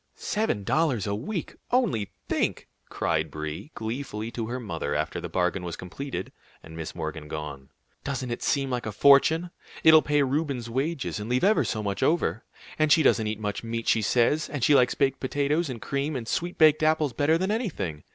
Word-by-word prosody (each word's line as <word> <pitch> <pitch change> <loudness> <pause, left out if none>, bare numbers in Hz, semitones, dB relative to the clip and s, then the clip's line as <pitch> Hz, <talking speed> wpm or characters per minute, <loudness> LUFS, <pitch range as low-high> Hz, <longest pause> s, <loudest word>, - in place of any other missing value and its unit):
"Seven 210 - -1
dollars 140 - +1
a 100 - -1
week; 155 - -4
only 220 - +1 0.2
think!" - - -1 0.2
cried 80 -1 -1
Brie, 75 - -6
gleefully, 110 -1 -4
to 115 -2 -4
her 125 +2 -3
mother 80 - -3
after - - -2
the - - -5
bargain 90 +1 0
was 85 -1 -5
completed, 135 +10 -6 0.3
and 80 - -11
Miss 80 -1 -6
Morgan 75 - -5
gone. 75 -3 -6 0.3
"Doesn't 130 -3 -3
it 120 - -4
seem 135 -2 0
like 120 -3 -2
a - - -2
fortune? 140 - +5 0.3
It'll 160 -1 +8
pay 145 -1 +2
Reuben's 135 -4 -2
wages, 135 -1 -2
and 105 +2 -6
leave 125 +1 +1
ever 210 +3 +4
so 110 -2 -2
much 100 -1 -2
over! 155 -7 +1 0.4
And 155 -1 +3
she 160 - +6
doesn't 110 -5 +3
eat 105 0 -3
much 105 0 -3
meat, 115 0 -4
she 110 - +3
says, 125 +8 +2
and 145 -5 -4
she 150 - +5
likes 125 -3 +4
baked 135 -1 +1
potatoes 145 +4 0
and 125 -3 -5
cream 140 +5 -2
and 120 -3 -4
sweet 175 +7 -2
baked 155 -1 +5
apples 155 -3 +2
better 145 +6 +2
than 190 +4 -1
anything. 160 - -3
130 Hz, 195 wpm, -26 LUFS, 105-155 Hz, 0.4 s, It'll